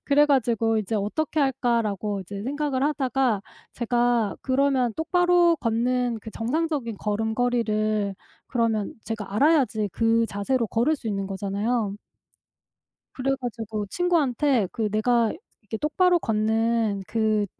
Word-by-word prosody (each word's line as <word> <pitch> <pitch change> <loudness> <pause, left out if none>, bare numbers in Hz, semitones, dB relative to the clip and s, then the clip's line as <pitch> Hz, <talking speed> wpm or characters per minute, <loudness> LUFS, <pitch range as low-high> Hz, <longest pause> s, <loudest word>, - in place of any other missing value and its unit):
그래 295 +1 +4
가지고 230 -5 +2
'이제 215 +1 -3
어떻게 280 +10 -1
할까?'라고 230 -7 0
이제 200 +2 -7
생각을 280 0 -1
하다가 265 -7 +1 0.3
제가 240 -2 +1
그러면 260 -3 +2
똑바로 350 +1 +3
걷는 245 0 0
그 220 - -9
정상적인 265 -1 -2
걸음걸이를 215 -1 0 0.3
그러면 225 -4 -1
제가 210 -3 -5
알아야지 260 -6 +3
그 230 0 +2
자세로 225 +4 -1
걸을 245 +8 +2
수 230 - -6
있는 195 -2 -2
거잖아요. 200 +2 -2 1.2
그래 270 +1 -1
가지고 225 -3 -4
친구한테 280 - +1
그 220 -3 -1
"내가 230 +1 +2 0.3
이렇게 210 +1 -5
똑바로 350 - +3
걷는 220 -2 0
그 215 -2 +1
230 Hz, 290 characters per minute, -25 LUFS, 215-270 Hz, 1.2 s, 그래